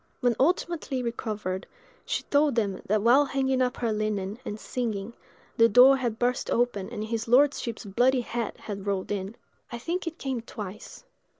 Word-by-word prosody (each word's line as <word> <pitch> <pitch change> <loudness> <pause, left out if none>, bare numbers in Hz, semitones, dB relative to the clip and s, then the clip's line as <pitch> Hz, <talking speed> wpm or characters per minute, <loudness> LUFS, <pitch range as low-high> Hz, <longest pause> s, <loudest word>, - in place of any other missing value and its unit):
When 245 -2 +2
ultimately 305 -3 0
recovered, 210 -5 -3 0.4
she - - -1
told 290 -2 +2
them 205 -5 0
that 210 +1 +1
while 250 +5 +6
hanging 265 -1 0
up 250 -1 0
her 230 -2 0
linen, 210 0 -2
and 210 - -5
singing, 225 -3 -3 0.4
the 230 0 +6
door 255 +5 +7
had 240 -4 -2
burst 245 +1 0
open 235 -5 0
and 210 - -5
his 225 +1 -3
lordship's 245 -3 +2
bloody 245 +6 +2
head 235 -1 -4
had 200 -1 -7
rolled 195 -1 -1
in. 200 +1 -3 0.4
I 235 - -4
think 340 +8 -3
it 330 - -4
came 260 -3 -3
twice. 215 - -9
235 Hz, 170 wpm, -27 LUFS, 210-260 Hz, 0.4 s, door